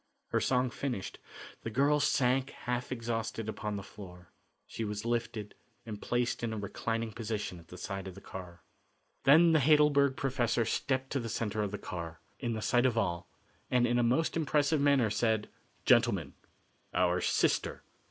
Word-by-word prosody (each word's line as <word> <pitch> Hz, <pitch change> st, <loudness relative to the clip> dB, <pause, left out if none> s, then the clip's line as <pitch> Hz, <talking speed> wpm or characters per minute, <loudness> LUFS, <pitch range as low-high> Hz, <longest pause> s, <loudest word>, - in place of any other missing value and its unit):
Her -, -, +2 dB
song 125 Hz, -1 st, +1 dB
finished, 120 Hz, -9 st, -4 dB, 0.4 s
the -, -, -4 dB
girl 140 Hz, +6 st, +3 dB
sank 135 Hz, -1 st, +2 dB
half 125 Hz, 0 st, -4 dB
exhausted 115 Hz, -2 st, -3 dB
upon 105 Hz, -1 st, -3 dB
the 100 Hz, -, -5 dB
floor. 90 Hz, -3 st, -12 dB, 0.3 s
She 115 Hz, -, -5 dB
was 105 Hz, 0 st, -4 dB
lifted 115 Hz, -3 st, -2 dB, 0.3 s
and 105 Hz, -2 st, -7 dB
placed 120 Hz, 0 st, 0 dB
in 115 Hz, -, -1 dB
a -, -, -4 dB
reclining 115 Hz, +2 st, -3 dB
position 105 Hz, -5 st, -4 dB
at 85 Hz, -, -17 dB
the 90 Hz, -, -10 dB
side 95 Hz, +1 st, -5 dB
of 95 Hz, -, -8 dB
the -, -, -9 dB
car. 90 Hz, -3 st, -10 dB, 0.6 s
Then 165 Hz, +5 st, +7 dB
the 160 Hz, -, +5 dB
Heidelberg 145 Hz, -1 st, +4 dB
professor 120 Hz, -3 st, +1 dB
stepped 130 Hz, +3 st, -1 dB
to 140 Hz, -, 0 dB
the 115 Hz, -2 st, -4 dB
centre 110 Hz, -1 st, -2 dB
of 105 Hz, -, -1 dB
the 105 Hz, -, -4 dB
car, 85 Hz, -4 st, -6 dB, 0.2 s
in 120 Hz, -3 st, -2 dB
the 110 Hz, -1 st, -4 dB
sight 120 Hz, +1 st, +3 dB
of 120 Hz, -2 st, -1 dB
all, 85 Hz, -5 st, -1 dB, 0.4 s
and 125 Hz, -1 st, +3 dB
in 120 Hz, 0 st, +2 dB
a -, -, +3 dB
most 130 Hz, +7 st, +2 dB
impressive 150 Hz, -1 st, +2 dB
manner 140 Hz, -6 st, +4 dB
said: 110 Hz, -1 st, +1 dB, 0.4 s
"Gentlemen, -, -, +3 dB, 0.6 s
our 90 Hz, 0 st, +2 dB
sister." -, -, +1 dB
115 Hz, 170 wpm, -31 LUFS, 105-130 Hz, 0.6 s, Then